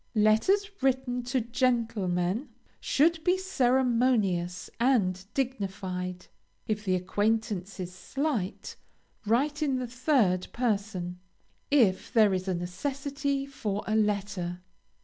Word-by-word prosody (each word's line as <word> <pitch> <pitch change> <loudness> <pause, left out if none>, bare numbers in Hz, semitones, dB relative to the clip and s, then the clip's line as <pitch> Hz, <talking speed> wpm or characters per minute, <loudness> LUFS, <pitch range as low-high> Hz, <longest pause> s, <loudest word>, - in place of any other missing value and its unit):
LETTERS 225 - +3
WRITTEN 255 -2 +1
TO 250 +1 -1
GENTLEMEN 230 -3 0 0.3
should 320 +3 +2
be 360 +1 +3
ceremonious 245 - +1
and 205 -8 +2
dignified. 190 -8 -3 0.4
If 210 -1 -1
the 185 -1 +2
acquaintance 205 +1 -1
is 180 -1 -5
slight, 235 0 -3 0.5
write 285 +7 +1
in 280 -3 +1
the 255 - -2
third 235 - +1
person, 200 -7 -2 0.5
if 230 -10 +3
there 215 -5 +5
is 185 0 -2
a 185 - 0
necessity 275 +10 -2
for 210 -7 -3
a 215 - 0
letter. 200 -4 -1
220 Hz, 110 wpm, -28 LUFS, 185-265 Hz, 0.5 s, there